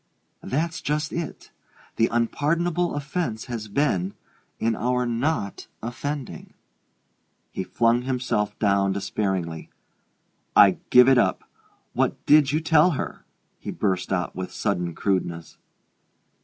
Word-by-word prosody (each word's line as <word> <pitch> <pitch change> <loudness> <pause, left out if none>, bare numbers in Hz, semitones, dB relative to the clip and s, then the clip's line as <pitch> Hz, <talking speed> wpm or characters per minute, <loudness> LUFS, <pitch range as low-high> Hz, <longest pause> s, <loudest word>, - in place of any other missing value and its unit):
"That's 160 +5 -2
just 150 +1 -2
it. 170 -1 -5 0.5
The 115 - +4
unpardonable 165 +9 0
offence 145 -6 -3
has 115 -4 -5
been 100 -6 0 0.4
in 115 0 0
our 125 +2 0
not 120 - -2 0.2
offending." 130 - -5 1.0
He 95 - -3
flung 115 +4 +2
himself 125 -5 -1
down 100 -2 +2
despairingly. 95 -4 -2 0.9
"I 100 -3 +7
give 125 0 +7
it 135 -2 +6
up! - - +1 0.5
What - - -1
did 145 -2 +5
you 155 +2 +1
tell 160 +2 +4
her?" - - -5 0.3
he - - -7
burst 95 -3 -1
out 90 -2 -1
with 95 0 -5
sudden 85 -2 -2
crudeness. 85 -4 -2
120 Hz, 115 wpm, -24 LUFS, 100-145 Hz, 1.0 s, I